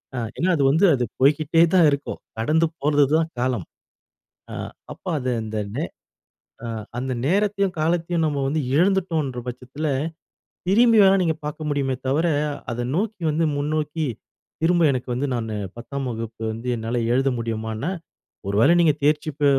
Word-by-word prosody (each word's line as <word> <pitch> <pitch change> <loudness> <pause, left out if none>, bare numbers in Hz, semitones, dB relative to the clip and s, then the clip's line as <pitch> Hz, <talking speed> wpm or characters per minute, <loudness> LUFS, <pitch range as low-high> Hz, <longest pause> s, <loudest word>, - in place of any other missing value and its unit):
அ - - -4 0.2
ஏன்னா, 185 - +1
அது 140 - +2
வந்து 165 +7 +4
அது 125 - -1 0.2
போய்க்கிட்டே 155 +4 +4
தான் 170 -4 +6
இருக்கும். 140 0 -3 0.2
கடந்து 155 +8 +2
போறது 145 0 +3
தான் 165 0 0
காலம். 120 -7 0 0.9
அ - - -5 0.4
அப்ப, - - -31
அத 130 - -6 0.2
அந்த 110 0 -4 0.2
நே 150 - -1 0.8
அ - - -4 0.3
அந்த 130 +1 -2 0.2
நேரத்தையும், 200 +1 +1
காலத்தயும், 165 +1 +1
நம்ம 145 -2 -1
வந்து 155 +3 0
இழந்துட்டோன்ற 165 -6 +1
பட்சத்துல, 130 +5 -5 0.8
திரும்பி 230 +3 +5
வேணா 195 0 +6
நீங்க 165 -2 +1
பாக்க 150 +1 -5
முடியுமே 140 -2 0
தவர, 150 +6 +2 0.4
அதை 120 +1 -2
நோக்கி 210 0 -2
வந்து 160 +2 +1
முன்னோக்கி 150 +1 -1 0.6
திரும்ப, 170 +1 +3
எனக்கு 130 0 -3
வந்து 130 +4 -1
நானு 115 -2 -3 0.2
பத்தாம் 130 +3 -5
வகுப்பு 115 0 -6
வந்து 115 +3 -6
என்னால 115 +2 -2
எழுத 135 +1 +2
முடியுமான்னா, 110 +4 -3 0.6
ஒரு 100 - -1
வேளை 165 - +6
நீங்க 160 -3 +5
தேர்ச்சி 150 +1 +2
ப - - +2
145 Hz, 155 wpm, -23 LUFS, 125-165 Hz, 0.9 s, தான்